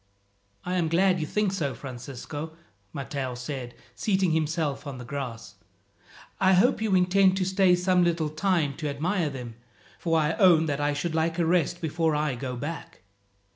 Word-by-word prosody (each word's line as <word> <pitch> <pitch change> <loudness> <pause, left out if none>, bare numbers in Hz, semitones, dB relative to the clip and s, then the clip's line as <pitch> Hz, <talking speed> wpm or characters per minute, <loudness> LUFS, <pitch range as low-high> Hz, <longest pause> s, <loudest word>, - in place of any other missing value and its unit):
"I 180 +1 -1
am 170 -2 +1
glad 180 +3 +3
you 155 - -2
think 210 +1 0
so, 155 -8 -2
Francisco," 135 +4 -7 0.4
Matteo 135 -2 -4
said, 125 -1 -6 0.2
seating 190 - +1
himself 155 -2 -1
on 135 -2 -6
the 125 - -8
grass. 125 -4 -6 0.8
"I 190 0 +4
hope 215 +5 +3
you 215 -3 +2
intend 185 +1 +4
to 185 - 0
stay 190 -1 +4
some 180 0 +2
little 165 -3 +1
time 155 -3 0
to 150 -2 -3
admire 165 +4 -1
them, 125 -4 -8 0.4
for 165 -1 +1
I 155 +1 +1
own 175 -5 +6
that 145 -2 -2
I 145 0 +1
should 160 +3 -2
like 160 +1 0
a 170 - +2
rest 175 +1 +1
before 160 -1 0
I 150 -2 0
go 125 +1 -5
back." 145 - -7
160 Hz, 175 wpm, -26 LUFS, 140-180 Hz, 0.8 s, own